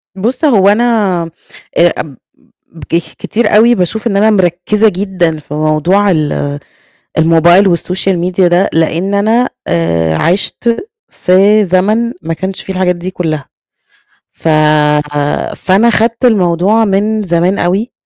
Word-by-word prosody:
بُصّ 240 - -2
هو 205 -9 +4
أنا 210 -5 +1 0.5
آآ 175 0 +4
أب 140 -5 -7 0.7
كخ 170 0 -2
كتير 215 -2 -1
أوي 235 +3 +5
باشوف 215 +3 -2
إن 205 -4 0
أنا 215 +2 +3
مركّزة 190 +2 +1
جدًا 185 -4 -2
في 150 -1 -10
موضوع 155 +7 +1
ال 145 -3 -2 0.6
الموبايل 170 +3 +4
والsocial 185 +2 -2
media 185 +1 -3
ده، 175 +2 +2
لإن 165 +4 -1
أنا 225 +5 +1 0.2
آآ 85 -1 0
عِشت 205 - -1 0.2
في 200 +4 +2
زمن 210 +6 0
ما 165 +1 -3
كانش 190 +4 -5
فيه 190 - -6
الحاجات 185 -1 0
دي 175 +2 -6
كلّها، 155 -6 -4 0.9
ف - - -7 1.1
فأنا 195 +5 +2
خدت 230 +2 0
الموضوع 200 0 +2
من 210 +2 0
زمان 175 +1 0
أوي، 195 +7 -1
190 Hz, 130 wpm, -12 LUFS, 170-215 Hz, 1.1 s, أوي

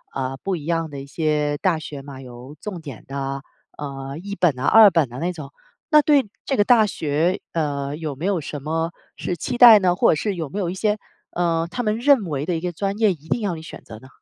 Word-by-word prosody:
呃， 135 0 -2
不 195 -1 -1
一 155 -3 -7
样 165 -1 -1
的 140 -1 -7
一 135 - -8
些 150 0 -1
大 180 -1 +1
学 145 -3 -8
吗？ 135 -1 -10
有 125 +3 -11
重 185 -6 -6
点 140 -7 -10
的， 135 0 -4 0.3
呃， 140 0 -6
一 200 +3 -6
本 165 -10 +2
啊 135 - -2
二 220 -2 +8
本 165 -7 +2
的 125 +2 -9
那 175 +2 -1
种。 150 -5 -9 0.4
那 300 -1 +7
对 285 -5 +3 0.2
这 270 - -1
个 205 - +5
大 225 -1 +5
学， 160 +1 0
呃， 145 -3 -2
有 155 -3 -5
没 155 - -5
有 195 -4 0
什 145 0 -6
么 165 +2 -1 0.2
是 175 - -4
期 240 - -3
待 235 -3 +10
呢？ 180 -2 +2
或 - - +4
者 - - +2
是 205 +7 -2
有 160 -5 -4
没 200 - -7
有 185 -4 -1
一 - - -4
些， 210 +2 0 0.3
呃， 170 -1 0
他 245 +7 -3
们 215 0 0
认 270 -5 +4
为 145 -3 -3
的 180 - 0
一 160 - -3
个 180 0 -2
专 195 +4 -3
业 215 -2 +3
一 160 -3 -9
定 240 - 0
要 200 -4 -1
你 160 - -8
选 160 - -11
择 110 - -11
呢？ 130 - -15
165 Hz, 270 characters per minute, -22 LUFS, 145-195 Hz, 0.4 s, 待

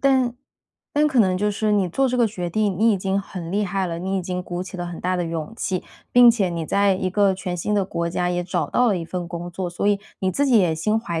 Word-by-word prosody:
但 260 -3 +3 0.6
但 300 +1 +3
可 270 -5 +3
能 185 -3 +3
就 210 +2 +1
是 210 +1 0
你 195 -3 +2
做 265 +10 +1
这 250 - -1
个 240 -2 +4
决 180 -5 -4
定， 200 0 0
你 225 +2 +4
已 - - +1
经 195 +1 -1
很 180 -3 -7
厉 205 +1 +1
害 190 0 -1
了， 165 -1 -4
你 190 +2 -2
已 185 - -1
经 180 0 -3
鼓 175 0 -4
起 185 +1 -8
了 175 -1 -4
很 175 -1 -7
大 185 0 0
的 175 - -1
勇 165 +3 -4
气。 185 -5 -2 0.3
并 245 -1 +8
且 210 -6 +1
你 170 -1 -3
在 200 +3 +2
一 185 0 -2
个 200 -1 +3
全 180 -1 -4
新 210 +5 -1
的 200 -2 +2
国 170 -2 -2
家 180 +1 -1
也 175 0 -1
找 175 - -2
到 250 0 +3
了 205 - +2
一 165 - -5
份 175 0 -5
工 175 0 -6
作， 180 +1 -4
所 175 +3 -3
以 205 -1 +2 0.2
你 190 - +1
自 285 +9 +1
己 250 -4 +5
也 175 -5 +2
心 210 +8 +1
怀 170 -7 -3
190 Hz, 305 characters per minute, -22 LUFS, 175-210 Hz, 0.6 s, 并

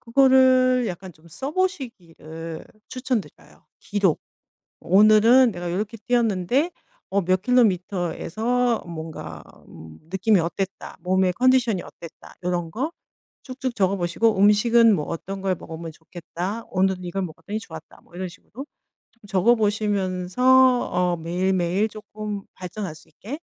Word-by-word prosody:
그거를 255 0 +4
약간 180 0 -7
좀 160 +2 -21
써보시기를 190 - -5 0.2
추천드려요. 255 -4 -5
기록. 200 -5 0 0.6
'오늘은 215 +5 +5
내가 175 -1 -5
요렇게 210 +5 -3
뛰었는데 240 - +1 0.4
어 200 0 +1
몇 185 +1 +1
킬로미터에서 220 +2 +1
뭔가 160 - -8 0.3
음 80 0 -13
느낌이 190 +1 +2
어땠다. 185 +3 -4
몸의 185 0 +1
컨디션이 250 -5 +3
어땠다.' 170 -1 -13
요런 175 -2 -2
거 275 - -3 0.5
쭉쭉 255 -2 -5
적어 195 -1 +2
보시고 190 +5 +1
'음식은 220 +2 +5
뭐 150 - -2
어떤 195 +4 -6
걸 190 -1 +1
먹으면 165 0 -8
좋겠다. 175 +6 -6
오늘은 185 -1 0
이걸 185 +2 -3
먹었더니 185 +5 -5
좋았다.' 160 -5 -12
뭐 - - -24
이런 185 0 -4
식으로 180 - -18 0.6
좀 230 - -37
적어보시면서 205 -1 +1 0.5
어 180 0 +1
매일매일 180 +4 0
쪼끔 210 -1 -7
발전할 185 -2 -6
수 155 - -18
있게 220 - -8
195 Hz, 300 characters per minute, -23 LUFS, 175-230 Hz, 0.6 s, 오늘은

